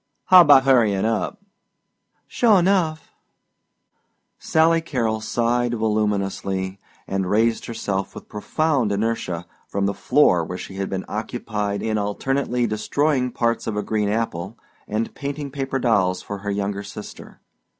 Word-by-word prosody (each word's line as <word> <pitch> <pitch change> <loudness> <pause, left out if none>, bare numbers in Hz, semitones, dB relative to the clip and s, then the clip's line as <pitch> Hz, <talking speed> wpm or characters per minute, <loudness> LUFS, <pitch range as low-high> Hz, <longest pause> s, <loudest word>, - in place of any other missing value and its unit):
"How 185 -1 +10
'bout 145 -4 +7
hurryin' 110 -7 +3
up?" 110 -1 -1 0.9
"Sure 225 -4 +3
enough." 175 -4 +1 1.3
Sally 165 +1 +3
Carrol 115 -8 -1
sighed 120 +2 0
voluminously 100 -3 -1 0.3
and 95 -1 -2
raised 115 +3 +1
herself 100 -4 -3
with - - -10
profound 130 +1 0
inertia 100 -5 -2 0.2
from 100 0 -1
the 100 - 0
floor 90 - +3
where 90 +3 -5
she 95 - -8
had 95 0 -2
been 95 -1 -3
occupied 105 -2 -3
in 110 -1 0
alternately 125 +4 -1
destroyed 125 +4 0
parts 115 -1 0
of 105 -2 -2
a 105 - -1
green 105 -2 0
apple 105 -2 -2 0.3
and 110 +2 -2
painting 140 0 -5
paper 135 -1 -2
dolls 100 -8 +1
for 100 -1 -6
her 100 +1 -5
younger 100 0 -2
sister. 100 +1 -10
110 Hz, 135 wpm, -22 LUFS, 100-130 Hz, 1.3 s, How